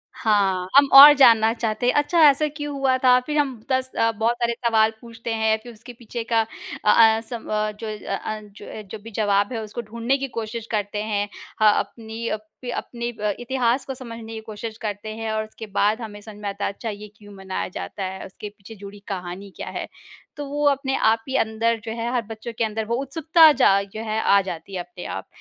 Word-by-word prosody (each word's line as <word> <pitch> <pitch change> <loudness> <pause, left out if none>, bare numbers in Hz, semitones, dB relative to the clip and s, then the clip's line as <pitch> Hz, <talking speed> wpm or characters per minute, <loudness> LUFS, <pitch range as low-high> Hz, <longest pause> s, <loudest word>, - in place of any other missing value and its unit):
हाँ, 195 -4 +1
हम 280 0 +8
और 285 +2 +12
जानना 230 -5 +6
चाहते 225 0 -2
हैं - - +4
अच्छा 310 +4 +2
ऐसा 295 +2 +2
क्यों 295 -1 -4
हुआ 265 -1 +2
था, 250 -1 +5
फिर 300 +4 -4
हम 270 -6 0
10 260 0 +1
अ, 230 0 +3
बहुत 225 +2 0
सारे 235 0 +1
सवाल 220 -1 +4
पूछते 230 -1 -6
हैं, 220 0 +2
फिर 240 -1 -10
उसके 235 +3 -12
पीछे 235 0 -6
का 225 - +4 0.4
अ 210 - +6 0.2
अ, 225 - -4
सम 230 0 -8
अ, 215 0 0
जो 215 +1 -8
अ 210 -2 -4
अ, 215 +2 -5
जो 205 0 -14
अ, - - -6
जो 210 +2 -9
भी 230 - -10
जवाब 205 +1 +1
है 225 - -3
उसको 215 +3 -6
ढूँढने 235 +4 -1
की 275 0 -3
कोशिश 225 0 -4
करते 210 -1 -2
हैं। 205 -1 -1 0.3
हाँ, 210 -1 +6
अपनी 225 0 -6
अप 215 0 -4 0.3
अपने 235 0 -4
अ, 210 -2 -2
इतिहास 250 +1 0
को 270 - -4
समझने 230 -3 -9
की 220 - -5
कोशिश 220 +1 -7
करते 215 0 -4
हैं 225 0 -4
और 215 0 -1
उसके 220 +1 -10
बाद 215 +3 +2
हमें 210 -2 -7
समझ 215 -1 -11
में 205 - -3
आता 200 +1 -4
है - - -1
अच्छा 225 - -6
ये 210 0 -7
क्यों 205 -1 -14
मनाया 190 -1 -4
जाता 195 +2 -6
है, 190 0 -5
उसके 205 +2 -9
पीछे 205 +1 -14
जुड़ी 200 0 -11
कहानी 185 +1 -6
क्या - - -7
है। - - -5 0.5
तो 290 - -4
वो 290 +1 -1
अपने 270 -1 -1
आप 225 +1 +2
ही 265 - -2
अंदर 225 +1 0
जो 225 - -4
है 235 +1 -2
हर 245 - +1
बच्चों 225 +1 -7
के - - +1
अंदर 220 0 -2
वो 235 +2 -1
उत्सुकता 320 +3 +5
जा 200 -8 +4
जो 200 +2 -8
है 220 0 -1
आ 200 0 +4
जाती 190 0 -7
है - - -2
अपने 175 0 -8
आप 95 - -8
220 Hz, 230 wpm, -23 LUFS, 210-240 Hz, 0.5 s, और